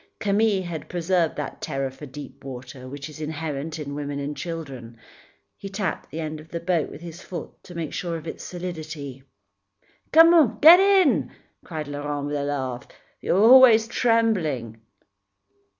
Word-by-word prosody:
Camille 205 -1 +1
had 170 -3 -6
preserved 175 -1 0
that 150 - -6
terror 135 -3 -3
for 145 +3 -11
deep 135 +1 -11
water 130 0 -9
which 140 +2 -7
is 155 0 -11
inherent 155 0 -4
in 145 -2 -6
women 145 0 -4
and 145 +1 -4
children. 135 -10 -7 0.6
He 195 - -8
tapped 195 0 -3
the 155 - -6
end 155 -1 -4
of 155 +1 -14
the 170 - -4
boat 170 -2 0
with 150 - -11
his 170 +1 -9
foot 170 -3 -7
to 180 - -11
make 165 -3 -4
sure 170 -2 -3
of 160 - -11
its 160 - -7
solidity. 155 -6 -7 0.9
"Come, 325 -4 +6
get 330 +4 +10
in," 385 -6 +3 0.3
cried 155 -3 -6
Laurent 145 0 -4
with 145 0 -3
a 145 - -1
laugh, 135 -3 -3 0.3
"you're - - +1
always 230 -1 +7
trembling." 180 - 0
160 Hz, 160 wpm, -24 LUFS, 145-185 Hz, 0.9 s, get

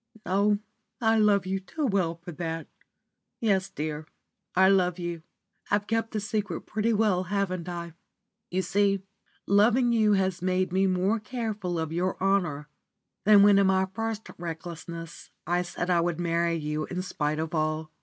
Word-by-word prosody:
Oh, 200 +2 +2 0.4
I 225 -2 +3
love 205 -3 +4
you 190 +1 -1
too 295 +11 -4
well 190 -8 +1
for 170 +1 -10
that! 165 0 -4 0.7
Yes, 195 -4 +1
dear, 155 -3 -4 0.5
I 190 +1 +6
love 185 -2 +3
you. 175 -2 -4 0.5
I've 205 0 +1
kept 225 +1 0
the 220 - -2
secret 210 -4 -2
pretty 220 +2 -1
well, 205 -4 +2
haven't 185 -2 -2
I? 170 -1 -5 0.6
You 185 +1 0
see, 200 -1 +1 0.4
loving 235 +5 +4
you 215 -2 +4
has 190 -2 +1
made 185 0 0
me 190 +1 +3
more 190 +4 +1
careful 210 -6 -3
of 160 -1 -2
your 180 +2 -1
honour 180 -7 +1 0.6
than 205 -1 +8
when 200 -1 +6
in 195 - +4
my 190 0 +3
first 225 0 -3
recklessness 170 0 -7 0.2
I 175 +1 +1
said 175 0 -3
I 170 -1 +4
would 170 -1 -1
marry 170 0 +1
you 150 -1 -2
in 180 0 -3
spite 150 -4 -2
of 160 +1 -3
all. 155 0 -1
185 Hz, 165 wpm, -27 LUFS, 170-205 Hz, 0.7 s, than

